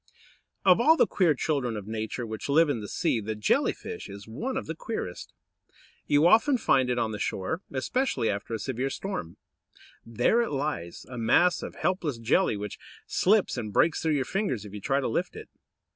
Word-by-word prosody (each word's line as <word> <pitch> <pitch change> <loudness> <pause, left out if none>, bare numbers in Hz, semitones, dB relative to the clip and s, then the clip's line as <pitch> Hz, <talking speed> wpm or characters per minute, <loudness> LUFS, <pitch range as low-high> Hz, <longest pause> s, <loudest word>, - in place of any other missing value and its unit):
Or 185 +3 +6
all 320 +6 +6
the - - +5
queer 170 -6 +2
children 130 -6 -1
of 105 - -7
Nature 110 +2 -4
which 110 +4 -6
live 155 +2 +4
in 135 -5 0
the 105 - -6
sea, 115 - 0
the 110 +1 -4
Jelly 105 - +2
fish - - -8
is 100 +2 -10
one 240 - -4
of 265 - -3
the 160 - -4
queerest. 160 - -5 0.8
You 145 +2 +4
often 230 +9 +5
find 130 - +2
it 125 - 0
on 115 -2 0
the 105 - -5
shore, 100 - -2
especially 140 - 0
after 105 +3 -2
a - - -2
severe 130 +3 -2
storm. 135 - -5 0.7
There 120 - +2
it 235 - -1
lies, 135 - -3
a 125 -2 -7
mass 175 +11 +3
of - - -7
helpless 170 -9 -1
jelly, 115 - +2
which 105 0 -6 0.3
slips 200 -6 +2
and 110 -3 -4
breaks 155 +10 +2
through 160 -2 +1
your 135 -2 0
fingers 190 - -2
if 105 - -10
you 105 - -7
try 135 +6 +1
to - - -1
lift 170 +11 -2
it. 440 0 -9
130 Hz, 200 wpm, -27 LUFS, 110-180 Hz, 0.8 s, Or